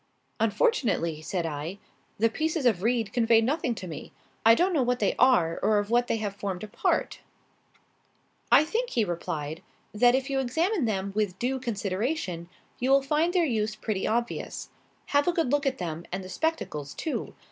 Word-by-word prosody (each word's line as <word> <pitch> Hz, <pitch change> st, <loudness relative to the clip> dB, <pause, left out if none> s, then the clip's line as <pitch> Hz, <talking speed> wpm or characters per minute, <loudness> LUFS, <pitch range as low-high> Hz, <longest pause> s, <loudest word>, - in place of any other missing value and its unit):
"Unfortunately," 220 Hz, -, +1 dB
said 170 Hz, +2 st, -2 dB
I, 160 Hz, +4 st, -4 dB, 0.4 s
"the 225 Hz, -, +4 dB
pieces 315 Hz, +4 st, -1 dB
of 215 Hz, -8 st, +3 dB
reed 230 Hz, -1 st, 0 dB
convey 230 Hz, -2 st, +4 dB
nothing 250 Hz, +1 st, 0 dB
to 185 Hz, -, -7 dB
me. 160 Hz, -, -8 dB, 0.3 s
I 225 Hz, 0 st, +7 dB
don't 360 Hz, +5 st, +2 dB
know 300 Hz, -, +3 dB
what 250 Hz, 0 st, +1 dB
they 205 Hz, -5 st, +1 dB
are 230 Hz, -11 st, +4 dB
or 215 Hz, -, +3 dB
of 205 Hz, +1 st, -1 dB
what 240 Hz, +1 st, +3 dB
they -, -, 0 dB
have 205 Hz, -2 st, -3 dB
formed 195 Hz, -2 st, -4 dB
a -, -, -5 dB
part." 210 Hz, -, -1 dB, 1.3 s
"I 290 Hz, -, +8 dB
think," 470 Hz, +9 st, -1 dB
he 230 Hz, -3 st, +1 dB
replied, 165 Hz, -3 st, -4 dB, 0.3 s
"that 245 Hz, +4 st, +5 dB
if 265 Hz, 0 st, -1 dB
you 275 Hz, -1 st, 0 dB
examine 320 Hz, -, 0 dB
them 200 Hz, -3 st, -1 dB
with 205 Hz, -4 st, 0 dB
due 260 Hz, +4 st, -1 dB
consideration, 200 Hz, -, -2 dB, 0.3 s
you 255 Hz, -, 0 dB
will 275 Hz, 0 st, +5 dB
find 305 Hz, +5 st, +1 dB
their 355 Hz, -2 st, +3 dB
use 220 Hz, -5 st, -1 dB
pretty 215 Hz, -3 st, -2 dB
obvious. 235 Hz, +2 st, -2 dB, 0.4 s
Have 285 Hz, +2 st, +3 dB
a -, -, +5 dB
good 325 Hz, -7 st, 0 dB
look 290 Hz, 0 st, +2 dB
at 265 Hz, -, 0 dB
them 170 Hz, -1 st, -5 dB
and 190 Hz, +1 st, -3 dB
the 185 Hz, -, -9 dB
spectacles 185 Hz, -, -2 dB
too. 315 Hz, -, -4 dB
230 Hz, 185 wpm, -27 LUFS, 190-270 Hz, 1.3 s, I